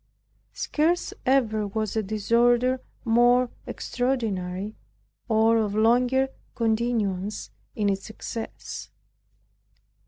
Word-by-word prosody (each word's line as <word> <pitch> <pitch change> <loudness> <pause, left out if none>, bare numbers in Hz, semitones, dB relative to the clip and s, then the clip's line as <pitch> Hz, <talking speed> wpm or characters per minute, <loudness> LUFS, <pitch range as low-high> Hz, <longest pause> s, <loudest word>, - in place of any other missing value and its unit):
Scarce 330 +4 0
ever 220 -6 +2
was 215 +1 -2
a 220 - +2
disorder 235 +5 +2 0.2
more 240 +2 +4 0.2
extraordinary, 210 -6 -2 0.6
or 225 +1 +4
of 210 -2 0
longer 250 +4 +3 0.3
continuance 220 -4 -1 0.2
in 210 -2 0
its 195 0 -1
excess. 225 +1 -6
225 Hz, 85 wpm, -26 LUFS, 210-245 Hz, 0.6 s, more